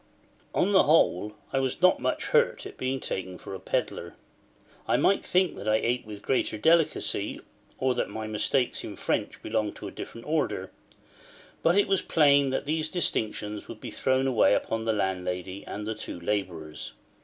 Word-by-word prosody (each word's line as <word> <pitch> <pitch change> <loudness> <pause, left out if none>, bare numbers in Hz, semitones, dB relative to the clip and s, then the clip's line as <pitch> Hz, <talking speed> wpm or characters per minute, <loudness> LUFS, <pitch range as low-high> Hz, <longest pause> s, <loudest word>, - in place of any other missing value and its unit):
On 195 - +3
the 190 - +6
whole, 105 - +3 0.2
I 135 - +2
was 130 -1 -1
not 185 +1 +5
much - - -1
hurt 475 0 +2
at - - -8
being 130 +1 -2
taken 95 -5 -4
for - - -9
a 95 - -5
pedlar. - - -2 0.7
I - - +3
might 200 - +3
think 185 0 +2
that 105 - -7
I 110 - +4
ate 120 +1 0
with 105 -1 -9
greater 125 -4 0
delicacy, 160 +7 +2 0.4
or 130 -1 +1
that - - -1
my 110 +1 -5
mistakes 110 +4 0
in - - -6
French - - -2
belonged 110 -1 -1
to - - -7
a - - -7
different 115 - -8
order; 155 0 -1 0.9
but 170 +3 +3
it 205 - +4
was 195 -1 +2
plain 140 -3 +4
that 130 - -1
these 155 +1 0
distinctions 105 - -1
would 110 - -9
be - - -7
thrown 130 0 +1
away 125 -5 +4
upon 115 0 -2
the 115 - +2
landlady 95 -1 -2
and 105 +1 -5
the 110 - -2
two 90 - -6
labourers. 85 -5 -3
115 Hz, 180 wpm, -28 LUFS, 105-150 Hz, 0.9 s, the